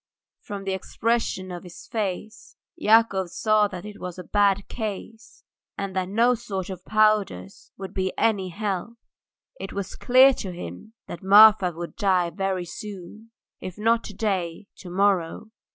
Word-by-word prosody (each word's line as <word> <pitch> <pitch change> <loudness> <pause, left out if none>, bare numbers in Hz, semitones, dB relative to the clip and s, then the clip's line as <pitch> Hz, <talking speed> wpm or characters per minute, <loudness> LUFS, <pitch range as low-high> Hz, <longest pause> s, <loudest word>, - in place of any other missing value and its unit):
From 200 -1 -7
the 195 -1 -2
expression 195 -1 -2
of 175 -1 -6
his 175 -2 -12
face 215 0 -5 0.2
Yakov 220 - +3
saw 215 +2 +2
that 185 -1 -8
it 210 -1 -9
was 180 -1 -6
a 180 - -7
bad 200 +1 +2
case, 220 +1 -7 0.3
and 195 -1 -4
that 185 -1 -1
no 235 +5 +3
sort 200 -5 -5
of 180 -1 -8
powders 210 - +1
would 195 -1 -7
be 190 -1 -1
any 200 -5 +1
help; 205 +4 -4 0.6
it - - -6
was 200 -1 -4
clear 260 +2 +6
to 190 -6 -5
him 175 - -9
that - - -8
Marfa 200 -1 +7
would 170 +1 -7
die 185 -4 +2
very 190 -2 -2
soon, 205 +4 -9 0.3
if 185 0 -8
not 230 +2 +2
to 205 - -9
day, 190 -4 -2
to 185 - -10
morrow. 195 +2 0
195 Hz, 155 wpm, -24 LUFS, 185-215 Hz, 0.6 s, Marfa